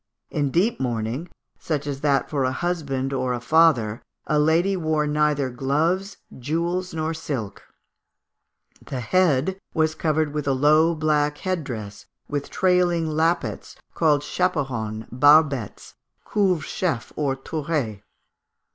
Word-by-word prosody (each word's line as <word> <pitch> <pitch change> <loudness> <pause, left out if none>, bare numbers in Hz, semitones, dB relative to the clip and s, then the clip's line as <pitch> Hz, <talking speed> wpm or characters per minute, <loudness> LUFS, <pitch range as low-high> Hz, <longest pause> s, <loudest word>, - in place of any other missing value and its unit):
In 145 -2 0
deep 190 - +1
mourning, 120 +5 -2 0.3
such 150 -3 -2
as 140 -1 -4
that 140 -2 +2
for 140 -3 -1
a 130 - +1
husband 140 -5 -2
or 130 -1 0
a 120 - -2
father, 125 -6 +3 0.2
a 150 - +1
lady 165 +6 +3
wore 155 -3 0
neither 150 -3 +1
gloves, 160 - 0 0.2
jewels, 170 +7 -2
nor 160 0 -2
silk. 135 -10 -5 1.2
The 130 - -5
head 185 +4 +1 0.2
was 155 -1 +2
covered 155 -2 0
with 150 -1 -3
a 135 - +3
low 155 +5 +4
black 150 -1 +1
head 185 -2 -2
dress, 110 -6 -7 0.2
with 145 -1 -3
trailing 175 -3 +2
lappets, 165 +3 -1 0.2
called 150 -3 +2
chaperons, 130 -11 -2
barbettes, 140 -3 +3 0.3
couvre 190 -6 +1
chefs, 140 - -2
and 140 -3 -1
tourets. 145 -10 -2
150 Hz, 130 wpm, -23 LUFS, 135-165 Hz, 1.2 s, low